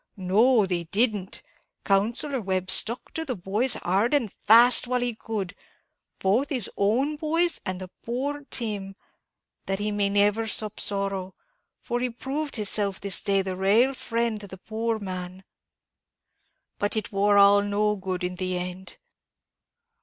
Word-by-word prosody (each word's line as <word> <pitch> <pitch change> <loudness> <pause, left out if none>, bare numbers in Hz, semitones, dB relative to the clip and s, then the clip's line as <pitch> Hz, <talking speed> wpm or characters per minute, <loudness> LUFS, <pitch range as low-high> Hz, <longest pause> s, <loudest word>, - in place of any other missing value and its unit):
"No, 210 +5 +3
they 175 -2 -2
didn't! 205 +1 -1 0.4
Counsellor 230 +7 +1
Webb 185 -2 -1
stuck 235 +4 +1
to 320 - -3
the 265 -6 -3
boys 210 +7 0
hard 200 +10 +1
and 235 -8 -1
fast, 240 +3 +5
while 250 0 0
he 245 -1 -1
could; 215 -4 -5 0.6
both 215 +9 +1
his 250 -8 -2
own 255 +9 +1
boys 330 +3 +1
and 185 0 -4
poor 280 +5 -3
Tim; 215 -5 -3
and 195 0 -11 0.7
that 195 - -1
he 210 +1 -2
may 205 -1 0
never 205 +2 +2
sup 215 -1 -1
sorrow; 195 -2 -2 0.4
for 240 - -3
he 250 0 -1
proved 275 +5 -4
hisself 205 -3 +1
this 200 -1 +2
day 195 -1 +1
the 190 -1 -4
raal 210 +8 +3
friend 230 -3 -2
to 200 - -9
the 190 - -10
poor 225 +3 -3
man 185 -2 -7 0.7
" - - -51
"But 205 +2 0
it 215 - -3
war 205 0 +3
all 200 0 +7
no 205 +1 0
good 185 -2 -4
in 180 0 -3
the 185 0 -2
end?" 180 +1 -6
205 Hz, 155 wpm, -25 LUFS, 195-240 Hz, 0.7 s, all